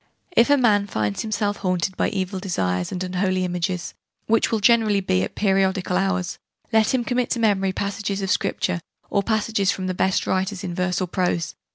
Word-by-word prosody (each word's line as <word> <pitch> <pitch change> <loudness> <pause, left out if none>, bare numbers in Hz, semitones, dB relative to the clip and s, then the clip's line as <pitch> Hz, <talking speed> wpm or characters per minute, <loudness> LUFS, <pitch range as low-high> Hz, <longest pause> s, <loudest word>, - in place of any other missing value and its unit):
"If 235 - +5
a 285 - +6
man 210 -6 +3
finds 105 - -1
himself 210 -2 -1
haunted 185 -1 -1
by - - +1
evil 190 0 -3
desires 90 - -1
and 185 0 -3
unholy 185 0 0
images, 180 0 -2 0.3
which 225 +1 +2
will 225 - +1
generally 215 -1 +4
be 95 - +1
at 95 - -4
periodical 190 -2 +1
hours, 185 -2 -1 0.3
let 220 -1 +4
him 255 -2 +1
commit 245 0 0
to 235 - -1
memory 200 -4 +2
passages 200 +1 -3
of 190 - -1
Scripture, 180 -2 0 0.3
or 200 - +2
passages 215 -1 0
from 190 -1 -1
the 185 - -1
best 190 +1 +1
writers 190 +1 -1
in 175 - -4
verse 180 +1 -1
or 185 - -1
prose. 175 -2 -1
190 Hz, 190 wpm, -23 LUFS, 180-205 Hz, 0.3 s, a